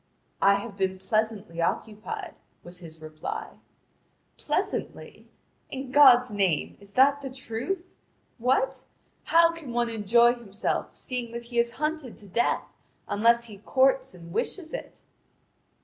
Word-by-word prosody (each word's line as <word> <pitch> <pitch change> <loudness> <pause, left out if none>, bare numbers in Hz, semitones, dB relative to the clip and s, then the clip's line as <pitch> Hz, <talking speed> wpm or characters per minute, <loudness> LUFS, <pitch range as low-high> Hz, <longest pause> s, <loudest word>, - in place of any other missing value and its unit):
"I 200 0 +6
have 200 0 -5
been 190 -1 0
pleasantly 215 -4 -1
occupied," 215 +5 -3 0.3
was 175 +1 -9
his 160 -2 -12
reply. 155 0 -6 0.8
"Pleasantly? - - -3 0.4
In 265 -1 -6
God's 255 -4 +7
name, 195 -7 0
is 200 0 -15
that 280 +2 +5
the 270 - -5
truth? 260 +8 -4 0.5
What? 260 - +1 0.4
How 335 0 +5
can 320 -7 -8
one 240 -1 0
enjoy 235 +2 +4
himself 215 -4 -3
seeing 245 -2 -5
that 235 0 -5
he 235 0 -2
is 235 0 +3
hunted 305 -4 -3
to 205 - -11
death, 235 +6 0 0.3
unless 235 +3 +3
he 215 -4 -6
courts 265 0 +2
and 170 -1 -11
wishes 320 - -3
it?" - - -7
235 Hz, 135 wpm, -27 LUFS, 200-260 Hz, 0.8 s, God's